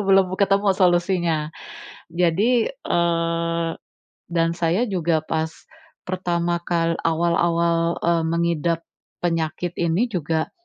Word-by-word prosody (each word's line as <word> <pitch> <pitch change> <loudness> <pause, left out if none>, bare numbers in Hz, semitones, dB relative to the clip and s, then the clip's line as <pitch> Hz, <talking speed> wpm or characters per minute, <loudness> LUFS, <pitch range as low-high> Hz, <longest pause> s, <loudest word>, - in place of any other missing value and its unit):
belum 190 -1 +4
ketemu 200 0 +3
solusinya. 175 -4 +1 0.6
Jadi, 195 - +2
eee, 170 - 0 0.6
dan 165 -1 +1
saya 170 +4 0
juga 165 -4 +1
pas 160 +1 -2 0.5
pertama 175 -2 -1
kal 170 -1 0
awal-awal, 170 0 +1
eee, 170 -1 +2
mengidap 170 0 0 0.4
penyakit 165 +1 -2
ini 175 +8 +1
juga, 160 -3 -1
170 Hz, 95 wpm, -22 LUFS, 165-180 Hz, 0.6 s, belum